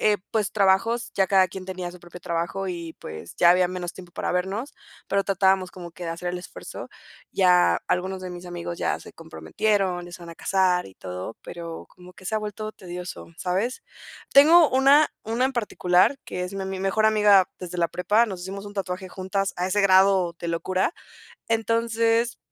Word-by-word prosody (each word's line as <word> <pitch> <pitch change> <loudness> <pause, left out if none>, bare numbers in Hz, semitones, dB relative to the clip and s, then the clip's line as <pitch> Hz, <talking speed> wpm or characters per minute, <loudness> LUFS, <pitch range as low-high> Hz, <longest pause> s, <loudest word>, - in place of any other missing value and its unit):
eh, 210 -1 +4
pues, 215 -3 0
trabajos, 215 +4 +2
ya 195 - +3
cada 190 -1 +4
quien 185 +1 -8
tenía 185 -2 -5
su 180 - -13
propio 175 +1 -12
trabajo 175 +4 -2
y 170 -2 -5
pues, 80 +2 -9
ya 175 - +6
había 180 +1 +4
menos 180 -1 -5
tiempo 180 -2 -13
para - - -3
vernos, 195 +9 -2 0.4
pero, 200 0 +1
tratábamos 190 -1 +2
como 175 -2 -9
que 175 +1 -9
de 165 - -3
hacer 175 +2 -4
el 180 - -4
esfuerzo. 180 0 -9 0.4
Ya 180 -2 +4
algunos 185 +1 -1
de 185 - -5
mis 175 0 -9
amigos 175 -1 -6
ya - - 0
se - - -12
comprometieron, 180 - -1
ya 175 - -12
se 175 - -10
van 170 - -9
a - - -10
casar 185 -2 +1
y 95 - -14
todo, 90 +4 -7
pero, 170 -1 -8
como 180 0 -16
que 185 - -17
se 220 - -2
ha - - +2
vuelto 215 0 -5
tedioso, 180 -2 -8
¿sabes? 195 +8 -1 0.5
Tengo 315 +3 +7
una 275 +3 +5 0.2
una 230 +3 0
en 270 - -3
particular 205 -2 +2
que 180 - -4
es 180 +2 -7
mi 195 - -3
ami 190 0 -4
mi - - -6
mejor 195 +3 +1
amiga 210 -3 +5
desde 180 -1 -7
la 170 -1 +2
prepa. 210 +6 +2
Nos 190 -5 -6
hicimos 195 +2 -6
un 205 - -10
tatuaje 185 -1 -4
juntas 190 +2 -2
a 180 - -1
ese 205 +2 +1
grado 190 -2 +4
de - - -5
locura. 185 - -1 0.5
Entonces, 230 +1 +1
185 Hz, 200 wpm, -25 LUFS, 180-210 Hz, 0.5 s, Tengo